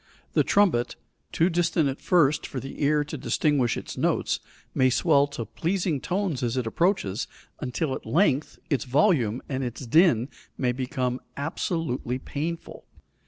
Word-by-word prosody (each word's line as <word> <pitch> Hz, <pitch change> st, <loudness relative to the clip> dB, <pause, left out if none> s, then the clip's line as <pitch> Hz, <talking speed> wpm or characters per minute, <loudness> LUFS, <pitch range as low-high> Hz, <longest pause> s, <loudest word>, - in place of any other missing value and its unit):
The -, -, +4 dB
trumpet 180 Hz, -13 st, +2 dB, 0.4 s
too 165 Hz, -, +3 dB
distant 165 Hz, -2 st, +2 dB
at 135 Hz, 0 st, -4 dB
first 150 Hz, -5 st, +3 dB
for 135 Hz, -, -5 dB
the 135 Hz, +3 st, -8 dB
ear 150 Hz, +1 st, +3 dB
to 145 Hz, -, -7 dB
distinguish 140 Hz, -6 st, +1 dB
its -, -, -7 dB
notes, -, -, +1 dB, 0.3 s
may 130 Hz, 0 st, +4 dB
swell 145 Hz, +1 st, +3 dB
to 140 Hz, -5 st, -5 dB
pleasing 165 Hz, -, -1 dB
tones 180 Hz, -7 st, -1 dB
as 120 Hz, 0 st, -1 dB
it 125 Hz, -, 0 dB
approaches, 115 Hz, -, 0 dB, 0.3 s
until 135 Hz, +2 st, -2 dB
at -, -, -5 dB
length 155 Hz, -5 st, +1 dB
its 140 Hz, -7 st, 0 dB
volume 130 Hz, -, +2 dB
and 135 Hz, -1 st, -2 dB
its 125 Hz, +1 st, -5 dB
din 130 Hz, -3 st, +4 dB, 0.3 s
may 125 Hz, -2 st, +1 dB
become 125 Hz, 0 st, -2 dB, 0.2 s
absolutely 145 Hz, -4 st, -2 dB
painful. 160 Hz, +5 st, -5 dB
140 Hz, 150 wpm, -26 LUFS, 125-165 Hz, 0.4 s, The